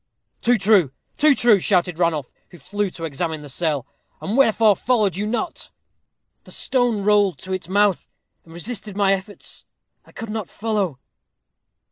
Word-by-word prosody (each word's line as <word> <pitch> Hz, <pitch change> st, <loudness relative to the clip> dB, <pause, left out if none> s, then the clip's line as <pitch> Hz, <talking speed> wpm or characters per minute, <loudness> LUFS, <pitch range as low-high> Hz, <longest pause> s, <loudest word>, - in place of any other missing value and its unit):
"Too 245 Hz, 0 st, +3 dB
true, 195 Hz, -8 st, +3 dB, 0.3 s
too 300 Hz, -2 st, +5 dB
true," 235 Hz, -5 st, +4 dB
shouted 180 Hz, -2 st, +1 dB
Ranulph, 160 Hz, -6 st, 0 dB, 0.2 s
who 175 Hz, -, -14 dB
flew 205 Hz, +7 st, -3 dB
to 170 Hz, -, -10 dB
examine 160 Hz, +1 st, -3 dB
the 145 Hz, -, -10 dB
cell. 145 Hz, -2 st, -1 dB, 0.3 s
"And 210 Hz, -, -3 dB
wherefore 225 Hz, -5 st, +4 dB
followed 215 Hz, -7 st, +1 dB
you 205 Hz, +2 st, -2 dB
not?" 245 Hz, +10 st, -3 dB, 0.7 s
"The -, -, -15 dB
stone 245 Hz, -6 st, 0 dB
rolled 205 Hz, -5 st, +3 dB
to 190 Hz, -, -4 dB
its 185 Hz, -2 st, -5 dB
mouth, 200 Hz, -1 st, +2 dB, 0.4 s
and 165 Hz, -, -18 dB
resisted 205 Hz, +3 st, -7 dB
my 195 Hz, -1 st, +3 dB
efforts. 195 Hz, +1 st, -7 dB, 0.4 s
I -, -, -20 dB
could 225 Hz, -1 st, -7 dB
not 215 Hz, -4 st, -4 dB
follow." 205 Hz, -, -2 dB
200 Hz, 155 wpm, -22 LUFS, 175-220 Hz, 0.7 s, too